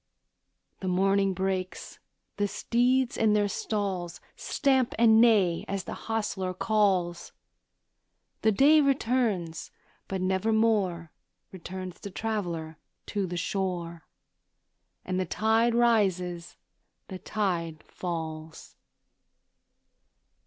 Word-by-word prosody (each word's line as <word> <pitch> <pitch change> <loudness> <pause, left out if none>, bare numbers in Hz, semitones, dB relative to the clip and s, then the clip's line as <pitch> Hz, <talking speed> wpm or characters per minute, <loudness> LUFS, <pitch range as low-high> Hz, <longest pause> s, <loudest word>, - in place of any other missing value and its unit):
The 190 - -5
morning 195 +1 +2
breaks; 190 0 -3 0.4
the 205 0 +1
steeds 245 +4 +1
in 220 -2 +3
their 205 -1 +2
stalls 195 -4 -3 0.2
Stamp 265 -3 +1
and 225 -1 +6
neigh, 200 -8 +4
as 195 -2 -3
the - - -6
hostler 205 -4 -3
calls; 190 -5 0 1.1
The 220 - +4
day 290 +8 +5
returns, 230 - 0 0.4
but 190 - -3
nevermore 190 -2 +1 0.4
Returns 185 0 -7
the 200 - -7
traveller 175 -7 -4 0.3
to 200 -2 -2
the 175 0 -4
shore, 175 -3 -3 1.0
And 185 0 -2
the 185 - 0
tide 225 +5 +2
rises, 185 -7 +1 0.5
the 190 -2 -7
tide 170 -8 -2
falls. 160 -2 -6
195 Hz, 95 wpm, -28 LUFS, 175-220 Hz, 1.1 s, and